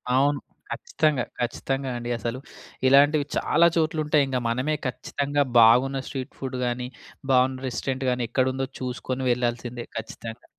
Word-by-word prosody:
అవును. 140 +1 +3 0.3
ఖచ్చితంగా. 150 -6 0 0.2
ఖచ్చితంగా 135 +2 -2
అండి 120 0 -5
అసలు. 120 +2 -4 0.5
ఇలాంటివి 145 +2 +5
చాలా 170 - +4
చోట్లుంటాయింగ, 150 -4 +1
మనమే 130 +6 0
ఖచ్చితంగా 140 +3 -1 0.2
బాగున్న 130 +4 +5
స్ట్రీట్ 130 -2 -5
ఫుడ్ 130 -1 -4
గాని, 125 +1 -2 0.4
బాగున్న 130 +1 +3
రెస్టారెంట్‌గాని 130 -1 -1
ఎక్కడుందో 130 0 0
చూసుకొని 130 +1 -3
వెళ్ళాల్సిందే 120 0 -2
ఖచ్చితంగా. 115 +1 -7
130 Hz, 115 wpm, -25 LUFS, 125-140 Hz, 0.5 s, ఇలాంటివి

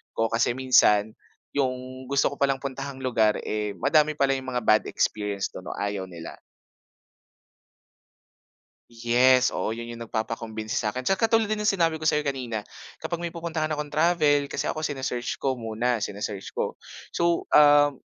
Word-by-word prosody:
ko. 115 0 +1
Kasi 115 +1 +2
minsan 110 -5 +4 0.5
yung 130 -1 -3
gusto 140 0 +2
ko - - -6
palang 135 -1 +1
puntahang 135 0 -5
lugar, 110 -4 +2
eh, 105 -1 -2
madami 155 - +3
pala 140 -2 +2
yung 130 -1 -5
mga 125 - -1
bad 110 0 +4
experience 100 -2 -1
dun - - -10
o - - -5
ayaw 100 -2 -3
nila. 85 -2 -10 2.5
Yes 120 +2 +3
oo. - - -2
Yun 115 +1 -5
yung 115 - -10
nagpapa-convince 110 -1 -4
sakin 120 +4 -3
sa 195 - +3
katulad 225 +3 +2
din 210 0 -2
yung 210 - +3
sinabi 165 -5 +1
ko 155 - +3
sayo 150 0 0
kanina. 125 -6 -3 0.3
Kapag 170 0 -4
may 170 - -2
pupuntahan 165 -2 -3
akong 150 -1 -4
travel 150 -3 +3
kasi - - -3
ako 155 - -2
sine-search 130 -5 -3
ko 135 - 0
muna. 115 0 -2
Sine-search 100 -1 -4
ko. - - -1 0.4
So, 170 0 +1
ah, 145 -1 +6
130 Hz, 160 wpm, -25 LUFS, 110-150 Hz, 2.5 s, ah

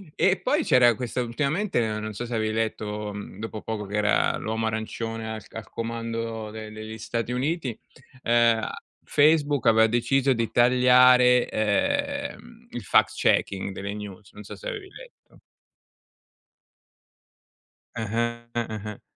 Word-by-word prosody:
E 190 -1 +2
poi 295 - +1
c'era 120 - +5
questa 125 +1 -3
ultimamente, 150 - -1 0.2
non 110 0 -5
so 120 +4 -5
se 120 0 -4
avevi 110 -1 0
letto 105 -1 -3
mhmm 100 0 -9
dopo 110 -1 -6
poco, 110 -2 -4
che 100 +1 -6
era 105 0 +2
l'uomo 110 +1 -2
arancione 110 0 -4
al 110 -1 -6
al 115 -3 -9
comando 115 -1 -4
de 110 0 -8
degli 110 +1 -8
Stati 115 +2 -3
Uniti, 130 -1 -2 0.5
ehm, 115 -1 +4
a - - -5 0.2
Facebook 145 -3 +3
aveva 110 0 +6
deciso 130 +4 +2
di 115 -2 -2
tagliare, 125 0 +5
ehm, 235 - -2
il 120 - -5
fact - - +3
checking 95 0 +1
delle 100 +2 -5
news, 105 -1 -9
non 105 - -10
so - - -9
se - - -9
avevi 420 -6 -6
letto. - - -16 2.6
Eh-eh, 115 +1 -2
eh-eh. 110 -3 -4
115 Hz, 140 wpm, -25 LUFS, 110-125 Hz, 2.6 s, aveva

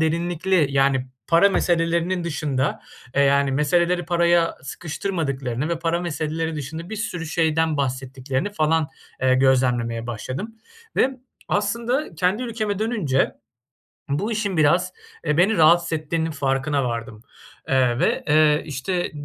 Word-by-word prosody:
derinlikli 170 +1 +1
Yani 135 -1 +2 0.2
para 170 +4 +5
meselelerinin 170 -1 +1
dışında 145 -4 -1 0.3
eee, 140 - +4
yani 140 0 +3
meseleleri 170 +5 +2
paraya 170 0 +2
sıkıştırmadıklarını 140 -4 -3
ve 170 -1 -1
para 170 +1 0
meseleleri 160 -1 -2
dışında 160 +6 -6
bir 220 - -4
sürü 180 -6 -4
şeyden 160 -1 +1
bahsettiklerini 135 +5 -2
falan, 160 -3 +1 0.3
eee, 130 0 +4
gözlemlemeye 125 -3 +2
başladım 130 - -5 0.4
ve 260 - +4 0.4
aslında 235 - -1
kendi 185 +8 0
ülkeme 220 -4 -2
dönünce 205 - 0 0.8
bu 195 +11 -1
işin 205 -4 -1
biraz, 170 +4 +3 0.3
eee, 150 0 +1
beni 195 +5 +3
rahatsız 170 +1 +5
ettiğinin 160 +1 -1
farkına 140 0 0
vardım, 115 -2 -4 0.4
eee, 130 -2 +2
ve, - - +1
eee, 150 0 +4
işte, 165 +6 -2
160 Hz, 125 wpm, -23 LUFS, 135-175 Hz, 0.8 s, para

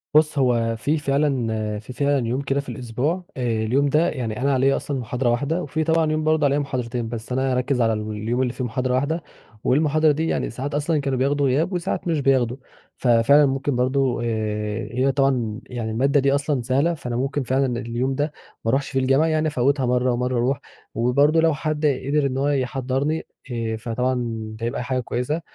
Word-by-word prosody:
بُصّ، 155 -1 +4
هو 120 -4 +2
في 145 +9 0
فعلًا 125 -8 0
في 110 +4 -10
فعلًا 140 -2 +1
يوم 125 +4 -1
كده 135 0 0
في 140 - -6
الأسبوع 130 +8 -2
آآ 115 -3 0
اليوم 135 +6 +2
ده 155 +4 +3
يعني 120 -4 -4
أنا 140 +1 +2
عليَّ 135 +1 +3
أصلًا 140 -2 -3
محاضرة 125 +1 -1
واحدة، 140 +9 0
وفي 155 +2 -2
طبعًا 160 -1 +2
يوم 155 0 0
برضه 155 -1 +2
عليَّ 140 +1 +2
محاضرتين، 125 -4 -3
بس 115 0 -6
أنا 130 +1 +1
هاركّز 125 0 0
على 115 -1 +3
اليوم 110 +3 -2
اللي 125 -2 0
فيه 125 - -4
محاضرة 125 +2 -1
واحدة، 150 +6 0 0.4
والمحاضرة 155 +3 +3
دي 160 +3 -1
يعني - - -1
ساعات 140 +3 -5
أصلًا 150 +1 +1
كانوا 135 -2 -1
بياخدوا 140 +1 +2
غياب، 150 +8 +1
وساعات 175 0 -2
مش 165 -3 +1
بياخدوا، 130 -3 +2 0.4
فَفِعلًا 125 +4 +5
ممكن 135 0 -1
برضه 130 +1 +1
آآ، 105 -1 -2
هي 130 +3 +2
طبعًا 125 -5 0
يعني 115 -3 -4
المادة 135 +6 +2
دي 140 0 +3
أصلًا 145 -2 0
سهلة، 135 +8 +1
فأنا 125 -7 -5
ممكن 135 +3 -1
فعلًا 130 -1 0
اليوم 125 +3 -2
ده، 145 +2 -1 0.3
ما - - +1
أروحش 135 +1 0
فيه 135 - 0
الجامعة، 135 +4 +3
يعني 155 -1 +1
أفوّتها 140 -1 +1
مرّه، 125 +1 +2
ومرّه 125 +1 -1
أرُوح 130 +3 +1 0.4
وبرضه 140 +7 +3
لو 165 -1 +3
حد 155 +1 -2
قدر 140 +1 +1
إن 130 -1 -1
هو 140 +1 +1
يحضّرني 135 +3 -1 0.3
آآ، 115 -2 -2
فطبعًا 120 +3 -1 0.5
ده 115 - -3
هيبقى 120 +1 -2
حاجة 130 +1 -1
كويسة، 125 +6 -2
130 Hz, 195 wpm, -23 LUFS, 120-145 Hz, 0.5 s, فَفِعلًا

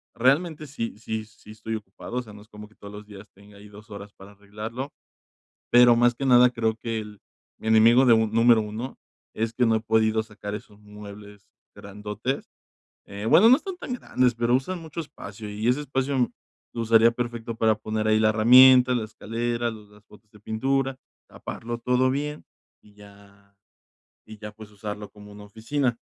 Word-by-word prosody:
realmente 150 +6 +1
sí 115 -6 -5
sí 110 0 -5
sí 110 0 -17
estoy 110 +1 -6
ocupado, 110 +3 -8
o - - 0
sea, 105 - -14
no 105 - -13
es 105 - -18
como 105 0 -12
que 110 - -25
todos 100 - -12
los 105 0 -10
días 105 0 -13
tenga 100 +1 -18
ahí 105 +1 -14
2 105 +1 -15
horas 100 0 -9
para 95 +1 -15
arreglarlo. 105 +7 -7 0.8
Pero 120 0 +7
más 120 0 +3
que 135 - -4
nada 125 -1 +6
creo 115 -2 -1
que 115 -1 -4
el 105 -1 -10 0.4
mi - - -8
enemigo 115 +4 +5
de 120 - +6
un 110 -1 +2
número 115 0 +4
1 110 +5 -6 0.4
es 115 0 -2
que 125 - +1
no 115 -1 +3
he 110 - -1
podido 110 0 +1
sacar 105 -1 -8
esos 105 0 -12
muebles 105 -1 -13 0.3
grandotes, 105 +6 -5 0.6
eh, 100 +2 -7
bueno, 210 - +6
no 255 - +8
están 375 +3 -7
tan 260 - -7
grandes, 125 - 0
pero 120 +1 0
usan 175 +8 -1
mucho 160 0 -7
espacio 105 -8 -9
y 105 +3 -2
ese 130 +4 +1
espacio 135 -2 -1 0.4
lo 115 - -5
usaría 115 0 +5
perfecto 120 -1 -5
para 110 -1 +2
poner 110 0 -3
ahí 110 0 +4
la 110 0 +3
herramienta, 125 +3 +7
la 115 -3 -1
escalera, 115 +2 -3
los 105 -2 -12
las 105 0 -20
botes 105 0 -20
de 105 - -19
pintura, 135 +5 -1 0.3
taparlo 120 +1 -7
todo 125 +2 +1
bien, 150 +2 -4 0.4
y 105 - -22
ya 100 -1 -18 0.8
y 110 0 -12
ya, 105 0 -9
pues, 105 0 -13
usarlo 105 0 -7
como 105 0 -14
una 105 0 -12
oficina, 115 +4 -2
110 Hz, 190 wpm, -25 LUFS, 105-125 Hz, 0.8 s, no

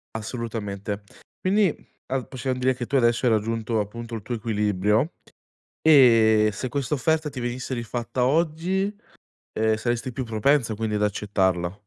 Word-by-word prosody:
Assolutamente. 105 -3 -4 0.4
Quindi, 195 -2 +3
mhmm, - - -20 0.2
a 130 -1 -2
possiam 130 0 -3
dire 130 0 +2
che 120 -1 -5
tu 140 - 0
adesso 120 0 +3
hai 115 - +4
raggiunto, 110 +1 0
appunto, 115 +3 -6
il 110 - -5
tuo 120 +3 -4
equilibrio. 105 - +1 0.7
E 115 -8 +6
se 125 +6 -4
questa 140 +2 -2
offerta 155 +3 +1
ti 130 - -6
venisse 125 +2 -3
rifatta 120 +1 -2
oggi, 170 +7 +1 0.7
ehm, 110 0 +2
saresti 120 +2 -2
più 130 +1 -3
propensa, 115 +1 +1
quindi, 110 0 -2
ad 105 - -1
accettarla. 95 -3 0
115 Hz, 150 wpm, -24 LUFS, 110-130 Hz, 0.7 s, E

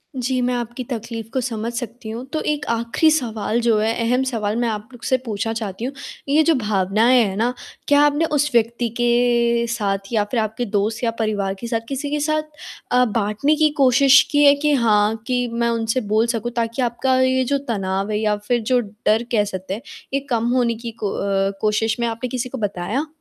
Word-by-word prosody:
जी, 255 0 -1
मैं 250 0 0
आपकी 240 +1 -4
तकलीफ़ 230 -2 -6
को 260 - 0
समझ 230 -2 -3
सकती 235 -1 -6
हूँ, 230 +3 -5
तो 310 - 0
1 300 -1 -2
आखिरी 235 +7 +2
सवाल 230 -6 -1
जो 230 -2 +3
है 220 +1 +1 0.2
अहम 250 +2 +2
सवाल 220 -5 -2
मैं 240 -1 +1
आप 210 -1 -4
लोग 245 - -14
से 260 - +2
पूछना 225 0 -2
चाहती 220 -1 -4
हूँ, 265 - -4 0.4
ये 305 +3 +4
जो 330 0 +3
भावनाएँ 215 +2 +3
हैं 195 -3 -2
ना, 235 +3 +1 0.3
क्या 290 0 +5
आपने 295 +2 +2
उस 295 -2 +1
व्यक्ति 235 +1 +1
के 240 -1 +2
साथ 200 -3 -2
या 215 -2 +3
फिर 245 - +1
आपके 220 +2 -2
दोस्त 215 +2 -1
या 230 - +2
परिवार 205 -3 -1
के 235 - -5
साथ 230 -1 -1
किसी 275 +1 -3
के 300 - 0
साथ 310 +1 0 0.5
अ, 250 0 +4
बाँटने 220 +6 +1
की 305 0 +3
कोशिश 270 +1 +6
की 290 0 +4
है 285 0 +7
कि 295 +1 +1
हाँ, 215 -4 +3
कि 245 -1 0
मैं 235 0 +1
उनसे 230 +2 0
बोल 220 +2 +3
सकूँ 235 0 -2
ताकि 230 +2 -1
आपका 245 +2 +1
ये 260 0 +3
जो 280 +3 0
तनाव 195 -2 -2
है 210 - 0
या 210 -1 +1
फिर 240 -1 +1
जो 250 +3 +2
डर 215 0 0
कह 215 -3 +3
सकते 190 -2 -5
हैं, 220 - -5 0.3
ये 275 - +2
कम 235 -2 0
होने 240 -2 +2
की 230 +1 -7
को 205 - -2
अ, 195 0 0
कोशिश 215 +1 +1
में 235 - +1
आपने 230 +2 -4
किसी 250 +1 -3
को 265 - -6
बताया? 210 - -2
235 Hz, 215 wpm, -21 LUFS, 215-255 Hz, 0.5 s, है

